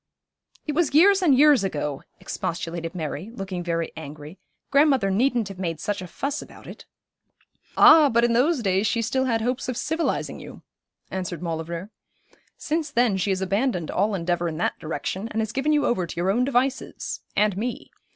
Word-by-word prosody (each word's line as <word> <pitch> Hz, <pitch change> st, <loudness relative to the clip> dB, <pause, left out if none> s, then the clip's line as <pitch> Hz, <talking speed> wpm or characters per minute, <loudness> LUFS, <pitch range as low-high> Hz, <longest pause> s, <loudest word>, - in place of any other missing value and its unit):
'It 300 Hz, -, -2 dB
was 300 Hz, -3 st, +1 dB
years 390 Hz, +5 st, +6 dB
and 295 Hz, -8 st, +4 dB
years 290 Hz, -5 st, +6 dB
ago,' 150 Hz, -7 st, -3 dB, 0.2 s
expostulated 165 Hz, +1 st, -4 dB
Mary, 160 Hz, +3 st, -4 dB
looking 190 Hz, -6 st, -5 dB
very 170 Hz, -1 st, -2 dB
angry. 155 Hz, +2 st, -9 dB, 0.3 s
'Grandmother 280 Hz, -8 st, +4 dB
needn't 235 Hz, +1 st, +1 dB
have 195 Hz, -2 st, -9 dB
made 165 Hz, -4 st, -3 dB
such 205 Hz, -2 st, -3 dB
a 180 Hz, -, -7 dB
fuss 280 Hz, -, -3 dB
about -, -, -13 dB
it.' -, -, -11 dB, 0.9 s
'Ah, 310 Hz, -3 st, +8 dB
but 235 Hz, -1 st, +2 dB
in 240 Hz, 0 st, +3 dB
those 265 Hz, +3 st, +2 dB
days 195 Hz, +1 st, +1 dB
she 230 Hz, -, 0 dB
still 260 Hz, +4 st, 0 dB
had 230 Hz, -3 st, 0 dB
hopes 250 Hz, +3 st, -2 dB
of 250 Hz, -, -3 dB
civilising 320 Hz, +2 st, -2 dB
you,' -, -, -11 dB, 0.5 s
answered 180 Hz, -2 st, -4 dB
Maulevrier. 170 Hz, +3 st, -4 dB, 0.7 s
'Since 315 Hz, 0 st, -2 dB
then 240 Hz, -5 st, +2 dB
she 190 Hz, +1 st, -1 dB
has 190 Hz, -1 st, 0 dB
abandoned 195 Hz, -3 st, -1 dB
all 205 Hz, +2 st, +1 dB
endeavour 175 Hz, -1 st, -1 dB
in 160 Hz, -2 st, -4 dB
that 175 Hz, -, -1 dB
direction, 190 Hz, +6 st, -4 dB
and 220 Hz, -, -3 dB
has 220 Hz, -1 st, -1 dB
given 275 Hz, +3 st, 0 dB
you 295 Hz, -1 st, +2 dB
over 185 Hz, -7 st, 0 dB
to -, -, -8 dB
your 180 Hz, +3 st, +1 dB
own 245 Hz, +5 st, +1 dB
devices 265 Hz, 0 st, -1 dB
and 210 Hz, -2 st, +2 dB
me. 235 Hz, +5 st, -4 dB
210 Hz, 180 wpm, -24 LUFS, 175-265 Hz, 0.9 s, Ah